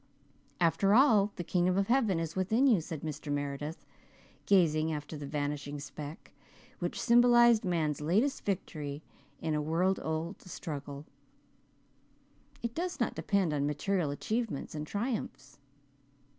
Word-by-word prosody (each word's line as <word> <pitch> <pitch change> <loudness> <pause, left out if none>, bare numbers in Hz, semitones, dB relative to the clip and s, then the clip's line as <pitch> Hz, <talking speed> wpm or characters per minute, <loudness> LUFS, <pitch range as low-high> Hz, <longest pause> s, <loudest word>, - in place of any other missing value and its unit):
"After 195 +4 +3
all, 220 -6 +5
the 175 - -4
'kingdom 180 +2 +1
of 195 - +2
heaven 230 -8 +2
is 165 -1 -4
within 220 +8 +2
you,'" 225 -10 +5
said 160 -1 -6
Mr. 150 -1 -5
Meredith, 145 +2 -4 0.6
gazing 160 -5 +3
after 150 +1 -5
the 145 -1 -6
vanishing 145 0 -3
speck 150 +1 -8 0.5
which - - -3
symbolized 240 -1 +5
man's 160 -6 0
latest 210 - +1
victory 155 -7 -4 0.4
in 160 - 0
a 150 - 0
world 170 +5 +1
old 160 +4 -3
struggle. 145 -5 -7 1.6
"It 235 -1 -2
does 350 +4 -3
not 235 - 0
depend 195 -6 0
on 145 -1 0
material 155 +3 0
achievements 215 - -3
and 150 0 -5
triumphs." 210 - -4
165 Hz, 130 wpm, -31 LUFS, 150-205 Hz, 1.6 s, all